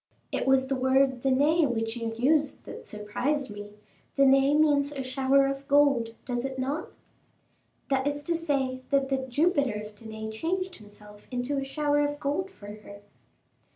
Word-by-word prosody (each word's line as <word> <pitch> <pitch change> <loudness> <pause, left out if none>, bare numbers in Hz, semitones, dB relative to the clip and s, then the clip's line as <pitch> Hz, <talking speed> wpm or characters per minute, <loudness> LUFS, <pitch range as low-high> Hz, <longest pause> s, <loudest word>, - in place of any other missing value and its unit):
"It - - -2
was 265 0 +4
the 270 +1 -1
word 260 0 +2
Danae 285 +5 +3
which 225 -2 -2
you 230 -1 -3
used 290 +4 +1
that - - -9
surprised 245 +6 -2
me. 205 0 -9 0.4
Danae 275 +1 +5
means 290 -2 +3
a 275 -2 -4
shower 265 +1 +3
of 275 0 -3
gold, 275 -6 +3
does 245 -1 -2
it 265 0 -4
not?" 280 +6 -3 1.0
"That 270 0 +1
is 290 0 -2
to 335 +3 0
say 275 -6 -1
that 275 -1 +2
the 265 -1 -1
Jupiter 285 -2 +2
of 210 0 -9
Danae 220 0 -7
changed 360 +10 -3
himself 210 0 -15
into 255 +3 -2
a - - -3
shower 290 +1 0
of 290 0 0
gold 300 +7 -1
for 295 - -15
her." 205 -1 -13
270 Hz, 165 wpm, -27 LUFS, 240-290 Hz, 1.0 s, Danae